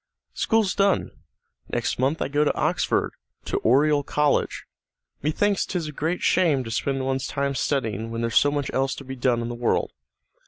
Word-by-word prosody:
"School's 220 Hz, -4 st, +1 dB
done. 200 Hz, -1 st, +1 dB, 0.6 s
Next -, -, -2 dB
month 135 Hz, +5 st, +1 dB
I -, -, -2 dB
go 145 Hz, +2 st, +1 dB
to 150 Hz, -, +2 dB
Oxford, -, -, 0 dB, 0.3 s
to -, -, -1 dB
Oriel 145 Hz, +5 st, +3 dB
College. 150 Hz, +1 st, 0 dB, 0.6 s
Methinks 195 Hz, +7 st, +1 dB
'tis 170 Hz, -5 st, -3 dB
a -, -, -6 dB
great 160 Hz, +4 st, -2 dB
shame 155 Hz, -8 st, +3 dB
to 115 Hz, -, -7 dB
spend 135 Hz, +3 st, -1 dB
one's 135 Hz, 0 st, -1 dB
time 140 Hz, 0 st, -1 dB
studying 115 Hz, -6 st, -1 dB
when 115 Hz, 0 st, -4 dB
there's 115 Hz, 0 st, -2 dB
so 145 Hz, -, +5 dB
much 145 Hz, -1 st, -2 dB
else 135 Hz, 0 st, 0 dB
to -, -, -9 dB
be 135 Hz, 0 st, -7 dB
done 120 Hz, -2 st, +1 dB
in -, -, -3 dB
the 120 Hz, -, -4 dB
world. 120 Hz, 0 st, 0 dB
140 Hz, 185 wpm, -24 LUFS, 130-150 Hz, 0.6 s, so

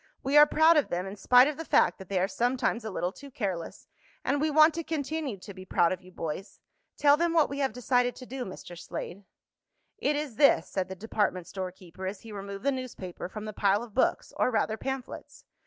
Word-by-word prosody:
We 275 Hz, +2 st, 0 dB
are 295 Hz, 0 st, +9 dB
proud 315 Hz, +2 st, +5 dB
of 295 Hz, -, +2 dB
them 180 Hz, +2 st, -2 dB
in 195 Hz, +1 st, -6 dB
spite 250 Hz, +6 st, +6 dB
of 300 Hz, -1 st, -3 dB
the 325 Hz, -, -4 dB
fact -, -, +3 dB
that 190 Hz, -, -11 dB
they 195 Hz, -, -1 dB
are 185 Hz, -, +2 dB
sometimes 240 Hz, +1 st, 0 dB
a 220 Hz, -, -4 dB
little 180 Hz, -2 st, -2 dB
too 280 Hz, +7 st, -12 dB
careless, 190 Hz, -10 st, -4 dB, 0.4 s
and 285 Hz, +2 st, +1 dB
we 310 Hz, -, +2 dB
want 310 Hz, +1 st, +6 dB
to 335 Hz, +1 st, -3 dB
continue 300 Hz, -6 st, -3 dB
to 200 Hz, +2 st, -10 dB
be 185 Hz, 0 st, -10 dB
proud 175 Hz, -2 st, +2 dB
of 185 Hz, -, -3 dB
you, 185 Hz, 0 st, -16 dB
boys. 165 Hz, +3 st, -6 dB, 0.4 s
Tell 285 Hz, 0 st, +5 dB
them 340 Hz, +1 st, +1 dB
what 315 Hz, -4 st, +3 dB
we 280 Hz, -, -4 dB
have 270 Hz, -3 st, +1 dB
decided 245 Hz, +1 st, +1 dB
to 255 Hz, -, -10 dB
do, 260 Hz, +1 st, -5 dB
Mr. 185 Hz, -3 st, -9 dB
Slade." 180 Hz, +3 st, -7 dB, 0.7 s
"It 295 Hz, -, +1 dB
is 290 Hz, -6 st, -4 dB
this," 280 Hz, -, +5 dB
said 185 Hz, -1 st, -3 dB
the 190 Hz, -, -5 dB
department 200 Hz, -3 st, -1 dB
store 185 Hz, 0 st, -5 dB
keeper, 185 Hz, 0 st, -9 dB
as 190 Hz, 0 st, -5 dB
he 225 Hz, -, -11 dB
removed 200 Hz, 0 st, -7 dB
the 280 Hz, -, +4 dB
newspaper 240 Hz, -10 st, -6 dB
from 215 Hz, +2 st, -7 dB
the 215 Hz, -, -6 dB
pile 200 Hz, +2 st, +2 dB
of 235 Hz, -3 st, -11 dB
books, 260 Hz, -, +1 dB
or -, -, +3 dB
rather, 220 Hz, -2 st, 0 dB
pamphlets. 265 Hz, +2 st, -6 dB
225 Hz, 230 wpm, -28 LUFS, 190-280 Hz, 0.7 s, are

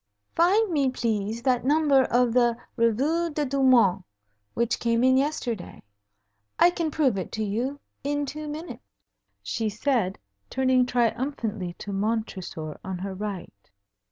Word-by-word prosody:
"Find 385 Hz, +5 st, +3 dB
me, 280 Hz, -4 st, +2 dB
please, 225 Hz, -2 st, -2 dB
that 255 Hz, -2 st, +2 dB
number 285 Hz, -1 st, +4 dB
of 245 Hz, -1 st, +2 dB
the 240 Hz, -1 st, +3 dB, 0.2 s
Revue 275 Hz, +9 st, +1 dB
des 300 Hz, -1 st, -1 dB
Deux 275 Hz, +1 st, -1 dB
Mondes 230 Hz, -8 st, +4 dB, 0.5 s
which 235 Hz, 0 st, 0 dB
came 230 Hz, 0 st, +1 dB
in 260 Hz, 0 st, +5 dB
yesterday. 260 Hz, -8 st, -2 dB, 0.7 s
I 350 Hz, -, +6 dB
can 335 Hz, -2 st, -2 dB
prove 275 Hz, -9 st, +1 dB
it 185 Hz, -, -6 dB
to 220 Hz, -, -2 dB
you 240 Hz, +7 st, -2 dB, 0.2 s
in 290 Hz, +1 st, -1 dB
two 305 Hz, +2 st, -6 dB
minutes," 310 Hz, +3 st, -7 dB, 0.6 s
she 225 Hz, -2 st, -2 dB
said, 215 Hz, -3 st, 0 dB, 0.3 s
turning 260 Hz, -1 st, +2 dB
triumphantly 235 Hz, -6 st, -1 dB
to 205 Hz, -, -6 dB
Montresor 195 Hz, -7 st, -3 dB
on 190 Hz, -2 st, -4 dB
her 190 Hz, +2 st, -5 dB
right. 190 Hz, -, -7 dB
245 Hz, 140 wpm, -26 LUFS, 215-285 Hz, 0.7 s, I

